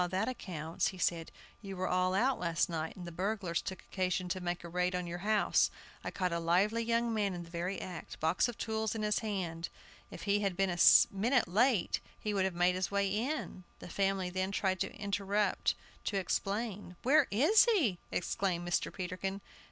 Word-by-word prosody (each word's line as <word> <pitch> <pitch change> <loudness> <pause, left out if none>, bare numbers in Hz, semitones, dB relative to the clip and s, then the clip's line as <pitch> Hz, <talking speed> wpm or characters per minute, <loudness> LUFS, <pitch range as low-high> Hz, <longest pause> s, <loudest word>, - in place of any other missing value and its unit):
that 190 +4 0
accounts," 170 -8 -2
he 190 - -5
said; 170 -2 -1 0.3
"you 195 -3 -7
were 185 0 -1
all 185 +1 +1
out 255 +6 +2
last 170 0 +1
night, 160 -2 -3
and 180 - -8
the 175 - -6
burglars 185 -1 -1
took 190 - -6
occasion 185 -1 -1
to 185 +1 -3
make 175 0 -3
a - - -6
raid 180 +1 0
on 180 -1 -2
your 175 +1 -5
house. 210 +2 +3 0.3
I - - -3
caught 180 -2 -1
a 170 - 0
lively 190 +7 +2
young 230 0 +1
man 205 -4 0
in 175 - -5
the 165 - -14
very 180 +3 -3
act; 180 -2 -7
box 160 +8 +2
of 240 - -6
tools 220 -1 -2
in 220 - -2
his 210 0 +2
hand! 180 -6 -3 0.4
If - - -9
I 200 +1 +3
had 195 -3 -1
been 195 -1 +2
a 175 - -3 0.3
minute 235 +5 +2
late 215 +2 +2 0.2
he 210 - -2
would 195 -2 +2
have 190 -2 -2
made 175 +1 +3
his 185 +1 -1
way 200 0 +1
in" 220 -2 -2
The - - -10
family 195 -1 0
then 185 +1 -1
tried 190 -1 0
to 195 - -2
interrupt 200 0 0 0.3
to 200 - 0
explain 195 +1 -2
"Where 295 +5 +5
is 305 - +5
he?" 305 - +2
exclaimed 175 -1 -1
Mr. 175 - 0
Peterkin. 190 +1 -4
190 Hz, 200 wpm, -33 LUFS, 180-210 Hz, 0.4 s, Where